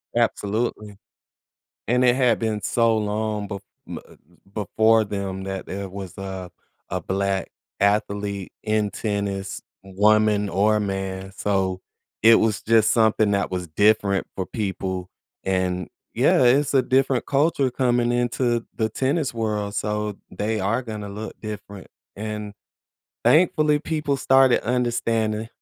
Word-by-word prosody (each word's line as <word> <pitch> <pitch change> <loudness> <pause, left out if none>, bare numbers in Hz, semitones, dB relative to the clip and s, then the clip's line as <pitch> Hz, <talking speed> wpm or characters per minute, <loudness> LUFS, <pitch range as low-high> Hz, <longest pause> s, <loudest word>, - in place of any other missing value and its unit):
Absolutely. 105 -2 -1 0.9
And 125 +2 +3
it 125 -1 +5
had 125 -3 +3
been 110 -2 -1
so 115 -2 +2
long 105 0 -2
be 100 - -4 0.4
uh, - - -14 0.4
before 110 +1 +3
them 100 -2 -4
that 95 0 -5
there 100 0 -5
was 95 -2 -8
a 95 -2 -6 0.4
a - - -1
Black 95 0 -1 0.3
athlete 100 -1 0
in 105 -1 +1
tennis, 100 -2 -3 0.2
woman 105 +1 +3
or 105 +2 +2
man, 95 -1 -3
so 95 -2 -1 0.4
it 115 0 +8
was 110 -2 +1
just 110 -1 +4
something 110 -2 +3
that 100 -1 0
was 90 -1 -3
different 100 +3 +2
for 95 - -2
people. 95 -3 -3 0.4
And, 90 -2 -1 0.3
yeah, - - +4
it's 135 +4 +3
a 135 - +5
different 130 0 +1
culture 140 -1 +2
coming 120 -2 +1
into 120 -1 0
the 110 -1 0
tennis 135 +4 -1
world, 105 -2 -2
so 105 0 -2
they 110 +1 -2
are 105 +7 0
gonna 105 -4 -6
look 105 +2 -7
different. 100 -2 -8 0.3
And, 105 0 -5 0.7
thankfully, 155 -3 +4
people 150 -3 -1
started 135 -1 +4
understanding. 115 -3 0
105 Hz, 130 wpm, -23 LUFS, 100-120 Hz, 0.9 s, it